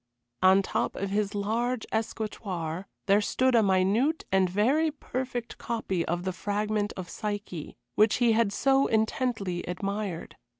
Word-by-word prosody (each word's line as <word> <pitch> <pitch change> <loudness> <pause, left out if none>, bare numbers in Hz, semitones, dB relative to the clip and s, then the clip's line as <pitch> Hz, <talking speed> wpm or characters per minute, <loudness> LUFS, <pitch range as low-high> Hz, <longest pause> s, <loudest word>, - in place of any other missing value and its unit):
On 190 +1 +6
top - - -1
of 195 0 -3
his 205 0 0
large 225 +4 -1
escritoire 195 -6 -3 0.2
there 200 0 +4
stood 260 +5 +1
a 230 - +6
minute 200 - +2
and 190 -1 +3
very 260 - +2
perfect 255 -4 -5
copy 205 -7 -2
of 175 +1 -2
the 185 0 -2
fragment 205 +2 -1
of 185 -2 -5
Psyche, 205 -6 -5 0.2
which 215 +1 +4
he 240 -2 +3
had 220 -2 +3
so 270 +5 +3
intensely 220 -4 0
admired. 195 0 -4
210 Hz, 140 wpm, -28 LUFS, 190-230 Hz, 0.2 s, On